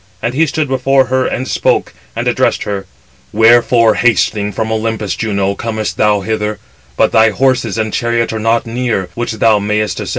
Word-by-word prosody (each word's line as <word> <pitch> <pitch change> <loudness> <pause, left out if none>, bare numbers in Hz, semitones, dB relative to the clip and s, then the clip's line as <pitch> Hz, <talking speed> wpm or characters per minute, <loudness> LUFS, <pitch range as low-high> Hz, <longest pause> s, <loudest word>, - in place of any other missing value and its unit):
And 120 +1 -3
he 160 +4 +2
stood 155 +1 -1
before 135 0 +2
her, 130 0 0
and 130 - -3
spoke, - - 0 0.2
and - - -3
addressed - - +1
her: 100 -2 -5 0.4
"Wherefore 115 0 +4
hastening 105 -2 +1
from 110 +2 -3
Olympus, 110 -3 -2
Juno, 100 -3 -1
comest 110 +1 -4
thou 105 -1 +2
hither, 105 +1 -2 0.4
but - - +3
thy 110 0 +5
horses 120 -1 0
and 110 -1 -2
chariot 120 -1 -1
are 110 - -3
not 115 +3 +1
near, 115 -5 -2
which 120 -1 -3
thou 110 -1 +3
mayest 105 +1 -1
ascend." - - -5
110 Hz, 175 wpm, -14 LUFS, 105-120 Hz, 0.4 s, thy